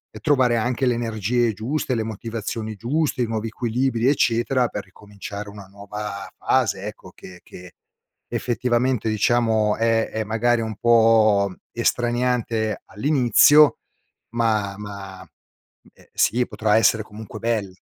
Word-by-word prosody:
e - - -8
trovare 130 -5 +2
anche 125 +3 -1
l'energie 115 -1 0
giuste, 130 +7 -2
le 110 - -1
motivazioni 110 0 -5
giuste, 135 +5 -1
i - - +1
nuovi 110 0 -3
equilibri 120 +1 -1
eccetera 125 -1 +2
per 105 - -6
ricominciare 100 +1 -9
una 100 -1 -11
nuova 100 0 -7
fase 110 -7 0
ecco, 100 -3 -10
che 90 -1 -13
che 90 0 -13 0.6
effettivamente 125 -1 0
diciamo, 110 -1 +2
è 115 0 +1
è 110 0 -3
magari 115 +2 +1
un 110 -1 -4
po' 110 -4 +4 0.2
estraniante 120 -2 -1
all'inizio, 140 +5 +4 0.6
ma 110 -4 0
ma, 100 -2 -9
mhmm, 95 - -14 0.7
ehm, - - -22
sì, 125 +2 +2
potrà 105 -1 +1
essere 115 0 +3
comunque 105 0 -10
bello. 110 -5 -2
115 Hz, 125 wpm, -22 LUFS, 105-120 Hz, 0.7 s, po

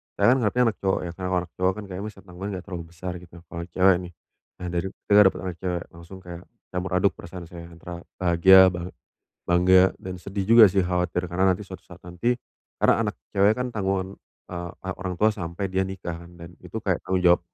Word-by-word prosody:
saya 120 - +4
kan - - +1
ngarepnya 120 +3 +2
anak - - -21
cowok 95 -1 +1
ya, 85 - -4
karena 90 -1 -4 0.2
anak 85 - -25
cowok 95 +1 +2
kan 105 - -6
kayaknya 95 +3 -5
besar 100 -2 -11
tanggungan 95 +2 -7
nggak 90 - -7
terlalu 90 -4 -6
besar 90 +2 -6
gitu, 85 -1 -17
apalagi 85 +1 -8
cewek 95 -1 +5
nih. 90 -1 -9 0.5
Nah, 90 - -4
dari 90 +2 -1 0.2
denger 105 0 +8
dapet - - -9
anak 90 - -4
cewek, 90 -2 -2
langsung 85 +3 -12
kayak 85 0 -9 0.3
campur 90 +1 -3
aduk 95 +2 +3
perasaan 90 0 -9
saya 85 -1 -10
antara 85 +1 -9 0.2
bahagia, 95 +1 +7
bang 85 0 -5 0.6
bangga 90 +2 +5
dan 95 -1 -8
sedih 100 +2 -4
juga 115 +2 +8
sih 95 0 +1
khawatir 90 0 -1
karena 95 +2 +2
nanti 95 +2 +1
suatu 95 -1 -10
saat 90 0 -16
nanti 90 +8 -1 0.5
karena - - +5
anak 105 - -3 0.2
cewek 100 +2 +4
kan 125 0 -3
tanggungan, 95 -2 -2 0.3
eee, 85 -1 -5
anak 95 -1 -4
orang 95 -2 -4
tua 110 +4 +3
sampai 95 -1 -5
dia 95 0 0
nikah 90 -3 -6
kan 85 +1 -14
dan 85 0 -11
itu - - -13
kayak - - 0
tanggung 95 -1 0
jawab 90 -1 +6
90 Hz, 220 wpm, -25 LUFS, 85-95 Hz, 0.6 s, denger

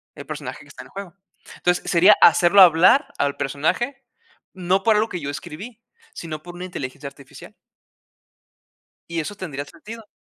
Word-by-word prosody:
El - - -10
personaje - - -7
que - - -19
está - - -11
en - - -16
el - - -23
juego. 195 -3 -9 0.4
Entonces, 180 0 -1
sería 180 +4 +6
hacerlo 175 +3 +6
hablar 180 - +5
al 140 0 -1
personaje, 160 - -2 0.5
no 185 +1 0
por 220 0 +3
algo 215 +2 +1
que 180 - -5
yo 140 - -4
escribí, 210 +11 -9 0.3
sino 155 -2 -7
por 175 0 -11
una 180 +1 -7
inteligencia 140 -5 -7
artificial. 140 -1 -13 1.6
Y 170 -1 -3
eso 205 +7 -7
tendría 150 -8 -6
sentido. 220 +8 -12
175 Hz, 165 wpm, -22 LUFS, 150-205 Hz, 1.6 s, sería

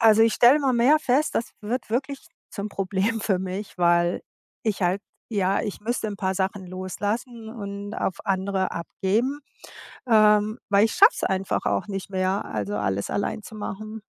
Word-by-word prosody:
also, 225 -1 +6
ich 225 0 +4
stelle 245 +4 +7
immer 275 -3 +1
mehr 255 +6 +5
fest, 295 0 +1
das 230 - -1
wird 235 +3 -3
wirklich 270 +4 -2 0.2
zum 205 0 -4
Problem 200 +3 -1
für 190 -4 +1
mich, 190 +1 -5
weil 175 0 +3 0.4
ich 210 -3 -1
halt 180 +3 +1 0.3
ja, 195 -2 +1
ich 205 - -5
müsste 225 +1 -2
'n 205 - -5
paar 190 -1 -1
Sachen 190 0 -2
loslassen 205 +6 -4
und 205 -2 -6
auf 185 - -2
andere 190 0 0
abgeben, 220 - -1 0.7
ähm, 215 0 +4
weil 205 +1 +5
ich - - -2
schaffe 410 +4 +7
es - - -5
einfach 190 - -1
auch 100 -1 0
nicht 195 -2 -5
mehr, 190 +1 0
also, 105 -1 -3
alles 100 -1 -1
allein 200 - -2
zu 220 - -10
machen. 215 +1 -6
205 Hz, 175 wpm, -25 LUFS, 190-225 Hz, 0.7 s, stelle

